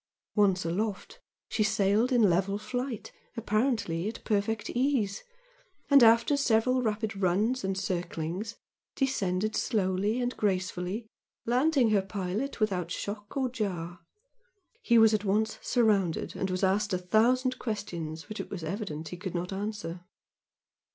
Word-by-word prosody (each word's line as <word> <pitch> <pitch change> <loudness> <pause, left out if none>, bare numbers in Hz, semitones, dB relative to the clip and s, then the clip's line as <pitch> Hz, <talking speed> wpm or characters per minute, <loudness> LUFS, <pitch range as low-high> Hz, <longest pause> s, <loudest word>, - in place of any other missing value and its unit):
Once 195 -4 +3
aloft 195 +4 -3 0.3
she - - -2
sailed 215 +3 +2
in 235 -4 +5
level 195 +3 +1
flight, 245 +2 -4 0.3
apparently 215 -6 0
at 225 - -6
perfect 210 +1 -1
ease 245 -6 0 0.7
and 280 -1 +8
after 230 +4 +6
several 255 -1 +2
rapid 220 -2 -1
"runs," 200 +7 +1
and 190 0 -1
circlings, 185 +3 -3 0.4
descended 215 -6 0
slowly 205 +1 0
and 245 0 -1
gracefully, 190 +1 -1 0.4
landing 255 0 +3
her 205 -2 +4
pilot 195 +7 -3
without 185 -6 0
shock 205 +5 -5
or 265 -1 +1
jar. 180 -8 -4 0.8
He 235 - +4
was 225 -1 +6
at 210 -1 +1
once 215 +2 0
surrounded 205 -9 +1
and 190 - -2
was 185 +1 -2
asked 200 +2 +2
a - - +2
thousand 245 +8 +2
questions 170 -8 -4
which 215 0 -7
it - - -5
was 185 -4 -6
evident 160 -3 -4
he 180 - -7
could 185 0 -5
not 180 +2 -3
answer. 200 -4 -4
210 Hz, 140 wpm, -29 LUFS, 185-230 Hz, 0.8 s, and